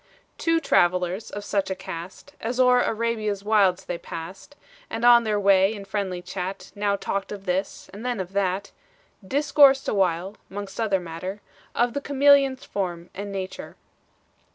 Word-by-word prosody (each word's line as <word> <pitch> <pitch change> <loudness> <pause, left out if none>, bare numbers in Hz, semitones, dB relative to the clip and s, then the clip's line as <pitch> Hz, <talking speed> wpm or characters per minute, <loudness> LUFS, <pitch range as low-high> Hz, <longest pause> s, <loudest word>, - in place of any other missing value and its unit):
Two 330 0 +2
travelers 180 - +1
of 205 - -6
such 200 -1 -1
a 190 - -2
cast, 190 +7 -9
As 240 +3 -3
o'er 250 -1 +5
Arabia's 215 -3 -1
wilds 195 -3 +3
they 175 -1 -4
passed 175 - -9 0.3
And 225 +1 -2
on 240 -1 +7
their 210 -1 +1
way 195 +1 +4
in 200 -1 -8
friendly 190 -3 -3
chat, 185 +1 -5
Now 205 0 0
talked 195 0 -3
of 200 -1 -7
this, 185 +1 -2
and 205 +3 -9
then 245 -3 -2
of 185 0 -5
that, 195 0 -1 0.5
Discoursed 275 +3 +4
awhile, 190 0 0
'mongst 200 +2 -7
other 200 -4 +1
matter. 180 +4 -6 0.4
Of 240 0 +2
the 285 - -2
chameleon's 280 -1 +4
form 175 -3 -4
and 200 +1 -6
nature. 190 -1 -6
200 Hz, 155 wpm, -24 LUFS, 185-230 Hz, 0.5 s, on